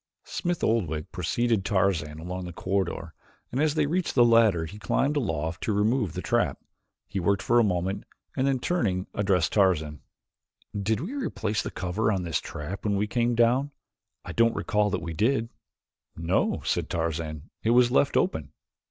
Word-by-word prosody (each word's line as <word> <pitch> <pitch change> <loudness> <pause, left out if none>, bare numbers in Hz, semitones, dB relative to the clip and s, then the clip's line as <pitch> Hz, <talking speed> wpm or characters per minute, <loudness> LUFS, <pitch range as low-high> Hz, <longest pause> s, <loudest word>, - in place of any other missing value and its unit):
Smith 175 -2 -2
Oldwick 80 -9 0
preceded 110 +4 0
Tarzan 95 -6 0
along 90 +3 -5
the 90 - -6
corridor 95 +3 -2 0.4
and 130 - 0
as 155 -1 +2
they 155 -2 +2
reached 175 +4 -1
the 120 -2 +6
ladder 110 -8 +4
he 100 +6 -9
climbed 135 - +1
aloft 80 - -2
to - - -1
remove 105 - +1
the 90 - -5
trap. 120 0 +1 0.5
He 100 - -3
worked 100 +2 +1
for 120 0 +4
a - - +5
moment 95 -1 -1 0.3
and 130 - +1
then, 135 -1 +2
turning, 105 - 0
addressed 95 -5 +1
Tarzan. 80 -7 +2 0.7
"Did 105 +3 0
we 195 - -5
replace 110 - -2
the - - -4
cover 105 +4 -1
on 95 -3 -1
this 85 -2 -1
trap 85 +7 -6
when 105 -1 +1
we 100 +1 +1
came 120 +2 0
down? 120 +4 +3 0.6
I - - -6
don't 115 0 +3
recall 105 -2 +1
that 95 -4 -2
we 85 -1 -4
did." 115 - +1 0.7
"No," 85 +3 0
said - - 0
Tarzan, 80 -2 -3
"it 110 - 0
was 120 +1 +5
left 70 - +3
open." 80 -3 0
100 Hz, 175 wpm, -27 LUFS, 85-120 Hz, 0.7 s, the